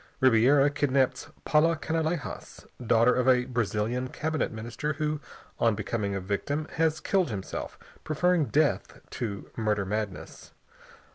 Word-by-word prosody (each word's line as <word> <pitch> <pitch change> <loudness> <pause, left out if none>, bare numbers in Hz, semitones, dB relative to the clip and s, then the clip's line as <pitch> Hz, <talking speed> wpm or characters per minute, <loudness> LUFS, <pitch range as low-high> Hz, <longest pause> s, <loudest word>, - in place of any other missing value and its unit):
Ribiera 130 +3 +5
kidnaps 140 -3 +1 0.2
Paula 165 +2 +4
Canalejas, 160 +1 -3 0.2
daughter 115 +1 +4
of 125 0 +1
a 125 -1 +4
Brazilian 120 +1 -1
cabinet 155 +4 -2
minister 120 +7 -4
who, 150 0 -2 0.4
on 115 -2 +3
becoming 105 -1 -2
a - - -1
victim, 125 +11 -2
has 160 -1 +2
killed 185 -1 +1
himself, 100 -4 -5 0.3
preferring 170 +1 +2
death 145 +5 0
to 105 -6 -5
"murder 105 -3 0
madness." 105 -1 -5
130 Hz, 125 wpm, -28 LUFS, 110-155 Hz, 0.4 s, Ribiera